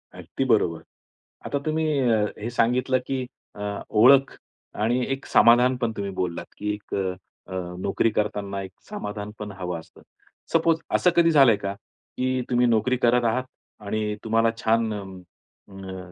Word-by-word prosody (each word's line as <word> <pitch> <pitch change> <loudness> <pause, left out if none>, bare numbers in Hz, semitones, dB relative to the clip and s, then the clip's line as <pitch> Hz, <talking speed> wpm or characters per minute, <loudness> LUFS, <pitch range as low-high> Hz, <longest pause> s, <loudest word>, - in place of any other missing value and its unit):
अगदी - - -4
बरोबर. 85 -1 +1 0.6
आता 140 - -1
तुम्ही 160 +1 0
अ, 115 -5 +2
हे 110 +3 -4
सांगितलं 125 +2 +2
की 130 -2 -2 0.3
अ, 105 - -9 0.3
ओळख 130 +5 +5 0.5
आणि 120 +3 +1
एक 135 - -7
समाधान 125 +2 +5
पण 120 -2 -1
तुम्ही 100 -1 -3
बोललात 85 -2 -2
की 105 0 -2
एक 105 0 -7
अ, 95 -1 0 0.7
नोकरी 100 +4 +1
करतांना 100 -2 -2
एक 95 - -9 0.2
समाधान 105 0 -5
पण 105 -1 -6
हवं 90 -2 -3
असतं. 80 - -17 0.5
सपोज 165 0 +3 0.2
असं 180 - +4
कधी 165 -1 +5
झालंय 135 -7 +6
का? 100 0 -4 0.4
की 130 0 0
तुम्ही 125 0 +3
नोकरी 120 +3 +2
करत 120 0 +3
आहात 120 +3 +1 0.4
आणि 105 0 -2
तुम्हाला 115 +1 +2
छान 115 -1 +1
अ, 105 - -4 0.7
अ, 95 -2 -8
115 Hz, 155 wpm, -24 LUFS, 100-125 Hz, 0.7 s, झालंय